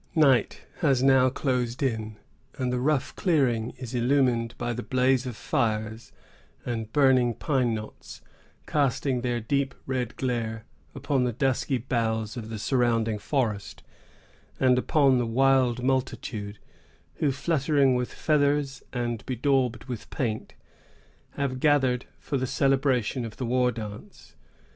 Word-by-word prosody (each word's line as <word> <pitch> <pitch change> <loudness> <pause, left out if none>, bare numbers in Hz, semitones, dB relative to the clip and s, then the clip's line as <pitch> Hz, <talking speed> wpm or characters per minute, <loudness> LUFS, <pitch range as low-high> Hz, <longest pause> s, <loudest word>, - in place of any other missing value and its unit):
Night 140 -6 +3 0.2
has 135 -6 +2
now 130 -1 +5
closed 125 -1 -1
in; 110 -4 -2 0.4
and 125 -2 -1
the 125 - 0
rough 140 0 0
clearing 130 - +1
is 125 -1 -7
illumined 120 -2 +1
by 120 0 -2
the 120 - -4
blaze 130 0 +1
of 125 - -5
fires 110 -1 -2 0.5
and 115 -3 -4
burning 130 -4 +4
pine 130 -6 0
knots, 110 0 -9 0.5
casting 135 -2 0
their 120 -1 -1
deep 135 +4 -1
red 125 -3 -2
glare 115 -4 -2 0.3
upon 135 -3 0
the 125 - +1
dusky 130 +2 0
boughs 110 -2 -1
of 110 -3 -6
the 110 - -5
surrounding 115 -2 +1
forest, 110 -3 -2 0.8
and 125 -1 +4
upon 135 -2 +3
the 120 - 0
wild 125 0 +2
multitude 125 -5 -2 0.6
who, 145 - +1
fluttering 140 -1 +2
with 125 -1 -1
feathers 145 -2 +1
and 120 -3 -3
bedaubed 130 -2 0
with 125 -4 -7
paint, 110 -4 -3 0.8
have 135 -2 -2
gathered 130 -4 +2
for 140 - -3
the 130 0 -1
celebration 135 -3 +1
of 115 -2 -7
the 130 - -3
war 125 +1 +2
dance. 105 -3 -9
125 Hz, 135 wpm, -26 LUFS, 115-135 Hz, 0.8 s, now